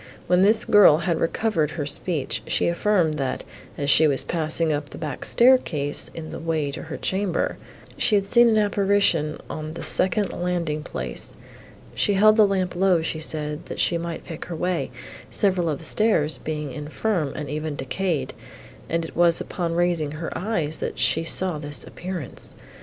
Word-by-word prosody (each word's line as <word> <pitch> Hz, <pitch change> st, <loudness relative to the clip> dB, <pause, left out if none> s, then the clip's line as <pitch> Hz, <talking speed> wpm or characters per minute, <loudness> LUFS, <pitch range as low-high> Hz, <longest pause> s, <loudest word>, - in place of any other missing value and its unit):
When 180 Hz, 0 st, +3 dB
this 215 Hz, +3 st, +5 dB
girl 205 Hz, -7 st, +7 dB
had 170 Hz, -1 st, -1 dB
recovered 165 Hz, -3 st, 0 dB
her 155 Hz, -2 st, -4 dB
speech, 150 Hz, 0 st, -1 dB
she -, -, +1 dB
affirmed, 170 Hz, -3 st, +1 dB
that, 135 Hz, -2 st, -2 dB, 0.3 s
as 140 Hz, 0 st, +1 dB
she 160 Hz, -, +5 dB
was 135 Hz, -3 st, +2 dB
passing 160 Hz, -1 st, -1 dB
up 145 Hz, 0 st, -4 dB
the -, -, -10 dB
back 150 Hz, -5 st, -5 dB
staircase, 205 Hz, -, +2 dB
in 160 Hz, -1 st, -7 dB
the -, -, -6 dB
way 160 Hz, -3 st, -1 dB
to -, -, -6 dB
her 160 Hz, -, -7 dB
chamber, 190 Hz, -2 st, -1 dB, 0.4 s
she 215 Hz, -, +3 dB
had 200 Hz, -1 st, +2 dB
seen 235 Hz, +3 st, +5 dB
an 220 Hz, -, +3 dB
apparition 200 Hz, -7 st, +2 dB
on 155 Hz, 0 st, -6 dB
the -, -, -6 dB
second 195 Hz, +2 st, +1 dB
landing 170 Hz, -4 st, -2 dB
place; 65 Hz, -, -4 dB, 0.6 s
she 205 Hz, -, +1 dB
held 215 Hz, +2 st, +6 dB
the 215 Hz, -2 st, +5 dB
lamp 185 Hz, -2 st, -1 dB
low, 180 Hz, -2 st, +2 dB
she 160 Hz, -1 st, -3 dB
said, 150 Hz, -1 st, -2 dB
that -, -, -7 dB
she 170 Hz, -, +2 dB
might 170 Hz, 0 st, -5 dB
pick 165 Hz, -2 st, -7 dB
her 175 Hz, -, -6 dB
way, 175 Hz, +1 st, -2 dB, 0.4 s
several 185 Hz, -4 st, +1 dB
of 150 Hz, -, -1 dB
the 160 Hz, -, -12 dB
stairs 160 Hz, -7 st, +3 dB
being 150 Hz, -2 st, -4 dB
infirm 150 Hz, -, -2 dB
and 150 Hz, -, -5 dB
even 155 Hz, 0 st, -3 dB
decayed, 145 Hz, 0 st, -2 dB, 0.6 s
and 165 Hz, 0 st, -1 dB
it -, -, -10 dB
was 170 Hz, 0 st, +3 dB
upon 170 Hz, -3 st, -3 dB
raising 170 Hz, -4 st, 0 dB
her 165 Hz, +2 st, -6 dB
eyes, 170 Hz, -6 st, -2 dB
that -, -, -5 dB
she 160 Hz, -, +2 dB
saw 175 Hz, 0 st, +2 dB
this 145 Hz, -1 st, -3 dB
appearance. 180 Hz, -4 st, -7 dB
165 Hz, 180 wpm, -23 LUFS, 150-190 Hz, 0.6 s, girl